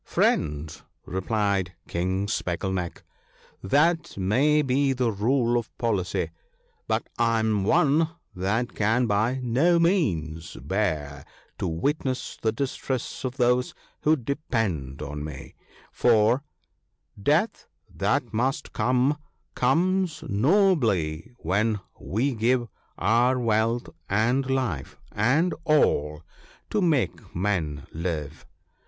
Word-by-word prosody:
' - - -47
Friend,' 75 +1 +1 0.2
replied 95 -1 -1
King 95 +3 -1
Speckle 90 -1 -2
neck, 90 -2 -4 0.3
* - - -30 0.2
that 165 - +2
may 135 +11 +3
be 135 +1 +2
the 125 -3 +1
rule 120 +3 +2
of 115 - -10
policy, 105 -6 -1 0.6
but - - 0
I 115 -1 +3
am 110 -3 +1
one 155 - +3 0.3
that 105 +7 -1
can 110 +4 +2
by 110 +4 +1
no 140 +9 +3
means 85 - 0
bear 75 - -2 0.4
to - - -1
witness 130 - -2
the 110 - +2
distress 130 +1 -3
of 130 0 -3
those 125 0 +2 0.3
who 155 +1 +4
depend 110 - -2
on 75 0 -5
me, 75 -2 -8 0.4
for, 115 0 +4
— 140 -6 -24
'• - - -12
Death, 160 - +1 0.3
that - - 0
must 130 +6 -1
come, 130 +4 +2 0.3
comes 185 0 +1
nobly 115 - +2
when 105 +5 0 0.2
we 125 +8 -1
give 120 +2 +1 0.3
Our 120 +6 +3
wealth, 115 +1 +1 0.2
and 120 +7 +1
life, 125 - -2
and 140 - +2
all, 75 - +2 0.5
to 210 - +1
make 155 -9 0
men 85 -7 -1
live." 80 -3 -4
115 Hz, 115 wpm, -26 LUFS, 95-135 Hz, 0.6 s, who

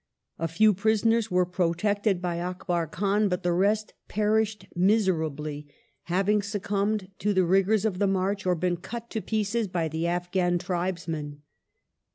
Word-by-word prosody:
A 165 - 0
few 210 +7 +4
prisonei 220 +3 +2
s 225 -1 -4
were 180 0 +3
protected 180 +2 0
by 170 -1 -1
Akbar 175 -1 -2
Khan, 200 +5 +1
but 180 -1 -2
the 175 -1 +1
rest 210 +4 +1
perished 215 0 0
miserably, 160 -7 0 0.4
having 195 +4 +2
succumbed 200 0 -2
to 205 -1 0
the 190 - +5
rigoui*s 195 +4 +3
of 190 -4 -1
the 200 - +3
march 195 +1 0
or 180 - +3
been 175 +1 0
cut 235 +6 -8
to 220 - -2
pieces 220 +1 -1
by 175 -3 -1
the 160 +2 -2
Afghjin 175 0 0
tribesmen. 170 -5 -3
190 Hz, 155 wpm, -27 LUFS, 175-210 Hz, 0.4 s, the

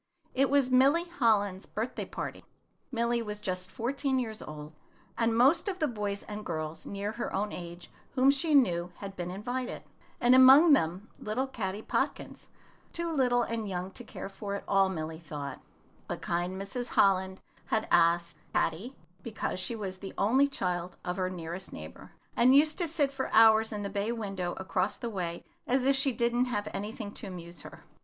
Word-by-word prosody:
It 270 +1 +2
was 275 -2 +3
Milly 275 +6 +5
Holland's 215 - +1
birthday 225 +4 -3
party. - - -6 0.5
Milly 235 -1 +1
was 210 -2 -5
just 185 -2 -3
fourteen 265 +4 -1
years 220 -4 -3
old, 150 0 -8 0.4
and 230 -1 +1
most 275 - +4
of 385 -2 -2
the 310 -4 +1
boys 205 -5 -3
and 210 0 -7
girls 155 -2 -5
near 200 +1 -3
her 235 +2 -4
own 205 +2 -1
age 175 0 -8 0.2
whom 265 +1 +6
she 295 +2 +1
knew 180 -9 +3
had 195 -1 -8
been 175 -1 -4
invited, 245 +7 -4 0.4
and 245 +1 +5
among 270 +5 +9
them 185 - +1
little 220 +5 -1
Caddy 210 -5 -4
Podkins, - - -2 0.4
too 340 0 -2
little 250 -5 +2
and 225 -3 -3
young 185 0 -4
to 245 - -9
care 225 - -7
for 200 +1 -5
at - - -5
all, 195 -1 +4
Milly 160 -3 -4
thought; 145 -3 -7 0.5
but - - -4
kind 175 +2 -2
Mrs. 240 +5 -4
Holland 190 -1 +3 0.3
had 220 0 0
asked 170 0 +3 0.2
Caddy, 195 +12 0 0.3
because 220 -4 -3
she 210 +6 -2
was 190 -4 -5
the 195 0 -8
only 260 +7 +4
child 180 -8 -3
of 180 0 -2
her 185 -1 0
nearest 175 +1 -6
neighbor, 80 0 -10 0.2
and 255 +3 +5
used 305 +3 +4
to 345 - +1
sit 295 -3 +1
for 265 -1 -3
hours 220 0 +6
in 210 -1 -4
the - - -2
bay 200 +3 -1
window 195 -6 -3
across 190 +1 -1
the 235 - -4
way 175 -4 -4 0.2
as 255 +1 +2
if 275 0 +4
she 270 0 +2
did 235 -1 +1
not 245 +1 +2
have 205 -4 -2
anything 210 +1 -5
to 210 - -5
amuse 175 -2 -7
her. - - -12
210 Hz, 185 wpm, -30 LUFS, 185-255 Hz, 0.5 s, among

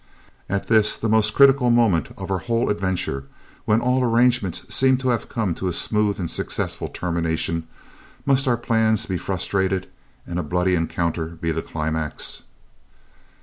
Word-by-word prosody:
"At 100 0 -2
this, 110 -2 +3
the 115 - -2
most 110 0 +2
critical 135 -2 +6
moment 115 -10 +3
of - - -6
our 95 - 0
whole 115 +3 0
adventure, 95 -9 -2 0.4
when 110 +2 +3
all 125 +1 +2
arrangements 120 -5 +2
seem 130 0 +4
to 130 0 -1
have 120 -3 -1
come 110 -7 -1
to 95 - -4
a 90 - -1
smooth 105 +3 +1
and 85 -3 -3
successful - - -2
termination, 85 -1 -2 0.6
must 135 0 +2
our 120 -2 +3
plans 110 -2 +1
be 95 -2 -3
frustrated, 95 0 -1 0.4
and 85 0 -4
a - - +1
bloody 90 +4 0
encounter 85 -1 -1
be 85 0 -4
the 80 0 -2
climax?" 80 -1 -3
100 Hz, 155 wpm, -22 LUFS, 85-115 Hz, 0.6 s, critical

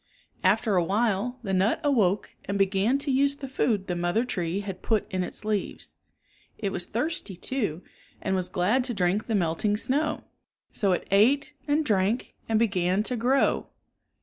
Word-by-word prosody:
After 210 -5 +3
a 175 - +3
while 215 +5 0
the 195 -3 -2
nut 190 +4 +2
awoke 210 -9 +1
and 200 - -2
began 195 +6 +2
to 280 0 -1
use 280 +2 +3
the 280 -1 -7
food 225 -6 0
the 180 - -2
mother 175 +7 0
tree 185 -4 -2
had 195 -2 -6
put 220 -3 +1
in 185 -1 0
its 205 - -7
leaves. 210 -2 -3 0.6
It 200 -3 -2
was 175 - -2
thirsty, 240 - -2
too, 190 - -3 0.4
and 190 - -1
was 185 -1 -2
glad 210 +9 +1
to 245 -3 -1
drink 185 +3 0
the 225 - 0
melting 190 +3 +1
snow. 295 +7 0 0.5
So 200 -2 +1
it - - -3
ate 275 +9 +3
and 300 +1 +2
drank 210 +2 0 0.2
and 220 - +3
began 195 -3 +1
to 250 - -1
grow. 250 +4 +2
210 Hz, 175 wpm, -27 LUFS, 190-250 Hz, 0.6 s, After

